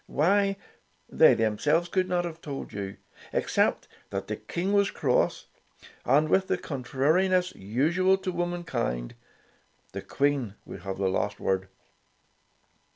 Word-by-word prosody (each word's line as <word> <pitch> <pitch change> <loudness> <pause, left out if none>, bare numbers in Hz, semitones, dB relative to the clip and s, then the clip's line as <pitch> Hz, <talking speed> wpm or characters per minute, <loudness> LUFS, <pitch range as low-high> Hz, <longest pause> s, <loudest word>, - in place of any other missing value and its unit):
Why, 195 +6 +2 0.5
they - - +6
themselves 150 +10 +1
could 185 +1 0
not 175 -1 +1
have 165 -1 -7
told 140 -3 -6
you, 100 -1 -5 0.3
except - - +1 0.2
that - - -3
the - - -3
King 185 +4 -3
was 200 -1 +4
cross, 130 -4 0 0.6
and 145 +4 +4
with 190 +3 +2
the - - +1
contrariness 160 +8 +1
usual 160 - +1
to 190 -1 -3
womankind, 170 - -2 0.8
the - - -5
Queen 140 -7 0
would - - -8
have 95 +2 -5
the 95 0 0
last 95 - -1
word. 95 0 0
155 Hz, 130 wpm, -27 LUFS, 115-180 Hz, 0.8 s, they